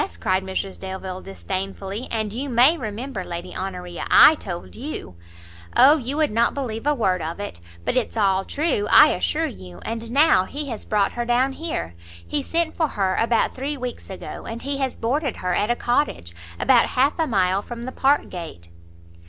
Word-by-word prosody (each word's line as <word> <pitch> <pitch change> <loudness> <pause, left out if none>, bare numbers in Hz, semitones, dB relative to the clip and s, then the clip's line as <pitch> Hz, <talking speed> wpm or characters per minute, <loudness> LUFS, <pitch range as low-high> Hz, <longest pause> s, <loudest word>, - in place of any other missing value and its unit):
cried 185 - +1
Mrs 190 0 -4
Delvile, 190 -1 -6
disdainfully, 195 - -5
"and 215 -2 -2
you 270 +5 -4
may 255 +6 +5
remember, 220 - -5
Lady 175 -1 -6
Honoria, 180 -2 -5
I - - +9
told 180 - -7
you 265 - -6 0.3
" - - -18 0.3
"O, 285 +5 +8
you 270 +1 -3
would 310 -5 +2
not 230 +2 +2
believe 245 -3 -4
a 295 - +3
word 190 -8 +1
of 165 +4 -4
it! 205 - -6 0.3
but - - 0
it's 245 -2 -1
all 195 -2 +2
true, 280 - -1
I 305 - +8
assure 320 +1 0
you! 90 - -8
and 230 0 -4
now 275 -9 +5
he 285 +6 -5
has 225 -3 -6
brought 205 -2 +1
her 240 - -3
down 245 +3 +2
here; 265 - -4 0.3
he 290 - -1
sent 330 +2 -1
for 320 - +1
her 195 -8 0
about 230 0 +2
three 280 +3 -3
weeks 250 -2 -6
ago, 190 - -8
and 230 +1 -6
he 280 +1 -2
has 265 -2 -1
boarded 265 +3 -1
her 180 0 -1
at 205 +5 +1
a 240 - +3
cottage, 240 - -1 0.3
about 245 -3 +5
half 275 +5 +1
a 320 - +2
mile 190 -4 +2
from 235 +2 -8
the 260 - -5
Park 275 +3 +2
gate." 160 - -8
230 Hz, 195 wpm, -23 LUFS, 190-275 Hz, 0.3 s, I